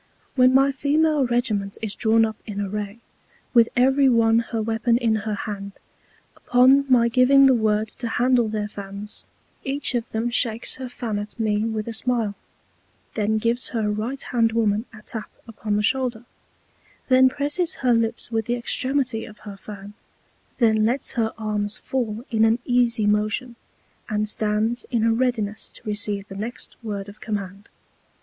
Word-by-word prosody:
When 255 -1 +5
my 270 +1 +4
Female 295 +1 +2
Regiment 215 -5 -1
is 210 -2 -2
drawn 225 +1 +3
up 220 0 -4
in 205 -2 -5
Array, 205 +2 -4 0.5
with 235 -2 +5
every 265 +2 +4
one 230 -1 +4
her 230 -1 -3
Weapon 225 +2 +1
in 235 -3 +1
her 210 - 0
Hand, 200 -1 -6 0.6
upon 260 +3 +4
my 235 -2 +5
giving 255 +3 +5
the 265 - +6
Word 215 -2 +1
to 240 - -3
handle 245 0 +2
their 210 -1 -2
Fans, 200 0 -9 0.4
each 275 -1 -1
of 240 -1 -2
them 230 +2 -2
shakes 230 -1 0
her 260 -1 -6
Fan 225 -4 -3
at 210 +3 -8
me 215 -1 +1
with 220 -1 -3
a 230 - -4
Smile, 225 -2 -1 0.8
then 220 0 0
gives 230 +3 0
her 220 -3 -1
Right 225 +6 -3
hand 230 -4 0
Woman 220 -1 +1
a 215 -2 -14
Tap 220 -1 -6 0.2
upon 215 -2 -3
the 210 - +1
Shoulder, 245 -1 0 0.8
then 260 0 +6
presses 295 +6 -1
her 245 - +5
Lips 230 +1 -1
with 225 -1 -1
the 240 - 0
Extremity 255 -1 -1
of 215 - -14
her 205 -1 -7
Fan, 200 0 -10 0.6
then 220 -3 +3
lets 245 +5 0
her 225 -3 0
Arms 210 0 -1
fall 235 -4 -3
in 220 -1 +3
an 225 +1 +4
easy 240 -3 +2
Motion, 215 +4 0 0.5
and 215 0 0
stands 215 +2 -1
in 235 -3 0
a 230 0 +3
Readiness 225 -4 -1
to - - -11
receive 205 -1 -1
the 195 - -9
next 220 +5 -6
Word 205 -3 -5
of 205 +1 -13
Command. 200 -1 -5
225 Hz, 170 wpm, -23 LUFS, 210-245 Hz, 0.8 s, the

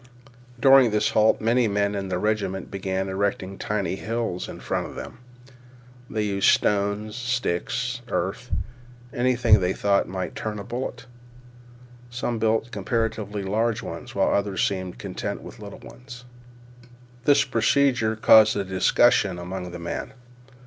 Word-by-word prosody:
During 135 -1 +7
this 105 0 +1
halt 110 0 +4
many 115 +2 +2
men 100 0 0
in 100 -1 -3
the 90 - -1
regiment 100 -2 -2
began 95 0 -2
erecting 95 0 -2
tiny 100 -2 -2
hills 110 -5 -3
in - - -8
front - - -2
of - - -11
them. 120 - -8 0.9
They 110 -1 -1
used 100 -2 +2
stones 105 +1 +1
sticks, 125 0 -2
earth, 115 +5 -3 0.6
and - - -5
anything 125 -4 +4
they 90 0 0
thought 100 -1 +1
might 95 -1 -4
turn 110 -1 -4
a 100 - -6
bullet. 120 +1 -5 1.0
Some 120 -1 -3
built 110 +2 +1
comparatively 105 -1 -2
large 110 +3 0
ones, - - -8
while - - +2
others 100 -2 +1
seems 95 -2 -4
content - - -5
with - - -11
little - - -9
ones. 125 -1 -12 1.0
This 140 0 +5
procedure 130 -4 +2
caused 110 -1 +6
a 100 - 0
discussion 95 +1 +3
among 90 +1 -6
the 85 - -7
men. 85 0 -5
105 Hz, 140 wpm, -24 LUFS, 95-120 Hz, 1.0 s, During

